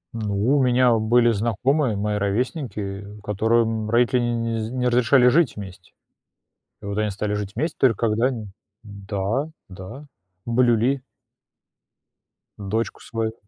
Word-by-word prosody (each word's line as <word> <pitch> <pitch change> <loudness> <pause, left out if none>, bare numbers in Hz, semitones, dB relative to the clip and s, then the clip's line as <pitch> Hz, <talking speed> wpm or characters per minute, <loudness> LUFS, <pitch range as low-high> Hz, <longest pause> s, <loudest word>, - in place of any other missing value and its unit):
Ну 110 +4 0
у 140 - +3
меня 125 -1 +4
были 115 +2 +3
знакомые, 120 +4 0
мои 105 +1 -1
ровесники, 105 - -2 0.2
которым 110 +1 0
родители 120 +2 +3
не 115 -1 -1
не 115 - -1
з 115 - -8
не 125 -1 -1
разрешали 125 +1 +4
жить 150 +2 +3
вместе. 95 -3 -10 0.9
И - - -12
вот 100 +1 -4
они 105 -1 0
стали 105 +1 -3
жить 105 -1 -3
вместе 155 +8 -2
только 120 -3 +2
когда 110 +3 +1
они... 120 -5 -3 0.4
да, 100 +6 -3 0.2
да, 95 +10 -9 0.4
блюли 120 +2 +2 1.6
дочку 105 +3 -3
свою. 115 -1 -3
115 Hz, 135 wpm, -23 LUFS, 105-125 Hz, 1.6 s, меня